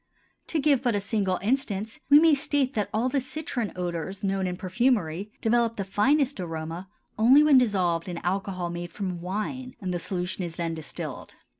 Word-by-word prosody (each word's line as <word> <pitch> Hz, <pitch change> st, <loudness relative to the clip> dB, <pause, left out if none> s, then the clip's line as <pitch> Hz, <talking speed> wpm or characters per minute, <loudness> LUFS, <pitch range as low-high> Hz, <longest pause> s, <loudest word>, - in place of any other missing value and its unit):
To 330 Hz, -, -1 dB
give 280 Hz, -3 st, +3 dB
but 240 Hz, -4 st, +1 dB
a -, -, +2 dB
single 200 Hz, -2 st, 0 dB
instance 220 Hz, 0 st, -1 dB
we 290 Hz, +1 st, +9 dB
may 325 Hz, 0 st, +5 dB
state 280 Hz, -1 st, +1 dB
that 205 Hz, -2 st, -1 dB
all 225 Hz, +4 st, +1 dB
the 275 Hz, +1 st, 0 dB
citron 260 Hz, -4 st, -4 dB
odors 180 Hz, +2 st, -4 dB
known 195 Hz, -1 st, 0 dB
in 180 Hz, 0 st, -3 dB
perfumery 200 Hz, -2 st, 0 dB
develop 230 Hz, 0 st, +2 dB
the 200 Hz, -, -2 dB
finest 265 Hz, +7 st, +2 dB
aroma 165 Hz, +1 st, -5 dB, 0.3 s
only 260 Hz, +7 st, +7 dB
when 290 Hz, -4 st, +7 dB
dissolved 185 Hz, -7 st, +1 dB
in 175 Hz, -, -4 dB
alcohol 185 Hz, -1 st, -2 dB
made 175 Hz, 0 st, -5 dB
from 180 Hz, -3 st, -4 dB
wine 215 Hz, +8 st, -4 dB
and 185 Hz, -2 st, -3 dB
the 175 Hz, -, -1 dB
solution 180 Hz, +1 st, -2 dB
is 170 Hz, -2 st, -5 dB
then 165 Hz, -1 st, -2 dB
distilled. 160 Hz, -2 st, -7 dB
200 Hz, 180 wpm, -26 LUFS, 180-255 Hz, 0.3 s, we